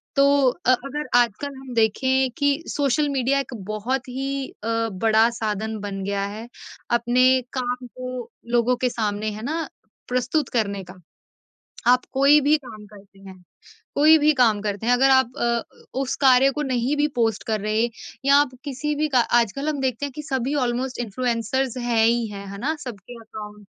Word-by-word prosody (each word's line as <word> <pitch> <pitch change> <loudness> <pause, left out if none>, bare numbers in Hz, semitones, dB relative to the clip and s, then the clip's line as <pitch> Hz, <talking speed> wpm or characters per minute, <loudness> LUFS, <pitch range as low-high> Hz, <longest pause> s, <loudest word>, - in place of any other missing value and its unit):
तो 275 -1 +5 0.2
अ, 255 0 0
अगर 275 +3 -2
आजकल 245 +5 -1
हम 265 -2 -9
देखें 260 +4 +2
कि 285 +2 +1
सोशल 290 +1 +1
मीडिया 275 0 +1
एक 265 - -5 0.2
बहुत 245 +6 -2
ही 270 +1 -3 0.2
अ, 230 0 0
बड़ा 220 +4 +3
साधन 220 0 -2
बन 195 -1 -5
गया 200 0 -1
है, 215 +3 -7 0.4
अपने 250 +2 +3
काम 250 -1 -3
को 255 -1 -7 0.3
लोगों 240 +1 +3
के - - +3
सामने 215 -2 -2
है 215 +1 -8
ना 320 +3 -2 0.4
प्रस्तुत 255 +3 0
करने 200 -3 -1
का। 185 +1 -13 0.9
आप 250 0 +5
कोई 280 +3 +5
भी 295 +2 +4
काम 220 -7 -11
करते 200 -1 -17
हैं, 190 -2 -13 0.5
कोई 310 +2 +7
भी 305 0 +4
काम 235 -6 +3
करते 205 +1 -3
हैं 245 - +5
अगर 265 +2 +4
आप 260 -2 +4
अ, 235 -1 +1 0.4
उस 270 -1 -1
कार्य 265 0 +6
को 300 - -4
नहीं 260 +1 0
भी 295 +1 +2
पोस्ट 225 -3 0
कर 220 -1 0
रहे 215 +3 0 0.4
या 280 0 +6
आप 290 -1 +4
किसी 295 +1 -3
भी 305 +1 0
का - - +7 0.2
आजकल 275 +6 -1
हम 295 -2 -2
देखते 260 +1 -1
हैं 285 - -6
कि 300 - -5
सभी 265 -1 -2
ऑलमोस्ट 250 +2 -3
इन्फ्लुएंसर्स 240 +2 -1
हैं 235 -2 +2
ही 235 0 +2
हैं, 200 -1 -8
है 200 - -7
ना? 285 +9 -1
सबके 240 -3 -9
अकाउंट 210 -2 -10
245 Hz, 180 wpm, -23 LUFS, 220-270 Hz, 0.9 s, कोई